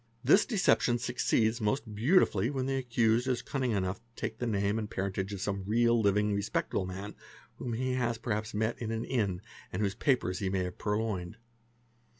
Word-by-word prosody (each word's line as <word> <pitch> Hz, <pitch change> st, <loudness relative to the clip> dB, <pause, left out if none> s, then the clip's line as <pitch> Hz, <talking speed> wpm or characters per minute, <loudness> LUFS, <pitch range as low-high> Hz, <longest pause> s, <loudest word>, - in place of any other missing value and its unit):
This 155 Hz, -, +5 dB
decep 215 Hz, -7 st, +3 dB
tion 120 Hz, -1 st, +2 dB
succeeds 120 Hz, -1 st, +1 dB
most 110 Hz, +1 st, -1 dB
beautifully 115 Hz, -, +3 dB
when 135 Hz, -2 st, -2 dB
the 135 Hz, 0 st, 0 dB
accused 120 Hz, -1 st, +2 dB
is 125 Hz, -2 st, 0 dB
cunning 130 Hz, -3 st, -1 dB
enough 95 Hz, -3 st, 0 dB
to -, -, -35 dB
~ 115 Hz, -, -38 dB
take 110 Hz, -, -4 dB
the 120 Hz, -, -1 dB
name 100 Hz, 0 st, +1 dB
and 105 Hz, -2 st, -4 dB
parentage 95 Hz, 0 st, -2 dB
of 100 Hz, -2 st, -5 dB
some 100 Hz, -1 st, -2 dB
real 115 Hz, +3 st, +3 dB
living 105 Hz, 0 st, +2 dB
respectable 100 Hz, -2 st, -1 dB
man 95 Hz, +3 st, -6 dB, 0.4 s
whom 120 Hz, -, -4 dB
he 130 Hz, +3 st, -1 dB
has 120 Hz, -2 st, 0 dB
perhaps 110 Hz, -1 st, -3 dB
met 110 Hz, +3 st, -1 dB
in 115 Hz, -, -3 dB
an 115 Hz, 0 st, -2 dB
inn 100 Hz, -7 st, -1 dB, 0.3 s
and 100 Hz, +4 st, -1 dB
whose 100 Hz, -1 st, 0 dB
papers 100 Hz, -6 st, +1 dB
he 95 Hz, -, -1 dB
may 95 Hz, -1 st, 0 dB
have 90 Hz, -1 st, -6 dB
purloined. 105 Hz, -3 st, -2 dB
110 Hz, 195 wpm, -31 LUFS, 100-120 Hz, 0.4 s, This